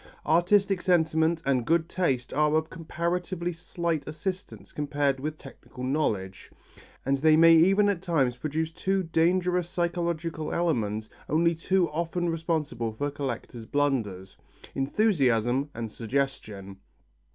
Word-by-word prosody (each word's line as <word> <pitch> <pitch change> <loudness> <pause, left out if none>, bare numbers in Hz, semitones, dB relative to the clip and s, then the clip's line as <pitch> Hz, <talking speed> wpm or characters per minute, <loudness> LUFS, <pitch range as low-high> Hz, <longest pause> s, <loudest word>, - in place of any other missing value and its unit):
Artistic 185 +4 +3
sentiment 160 -2 +2
and 130 -3 +2
good 165 +5 +1
taste 135 -10 -1
are 150 +2 +2
of 160 0 0
comparatively 175 +2 -3
slight 165 -2 -3
assistance 155 - -6
compared 145 -2 -1
with 155 +3 -4
technical 130 -2 -11
knowledge, 110 -9 -2 0.5
and 135 +1 +2
they 155 +1 +5
may 165 +1 +8
even 195 +5 +5
at 200 -4 0
times 145 -9 +1
produce 155 +5 -3
two 190 +3 -1
dangerous 175 +1 +1
psychological 170 -3 -2
elements 110 -11 -1 0.2
only 170 +2 +3
too 175 +2 +1
often 170 +2 -1
responsible 155 -8 -2
for 145 +7 -3
collectors' 120 -4 -5
blunders: 115 -10 -1 0.4
enthusiasm 135 - +1
and 115 -2 -5
suggestion. 110 -6 -3
155 Hz, 120 wpm, -27 LUFS, 130-170 Hz, 0.5 s, may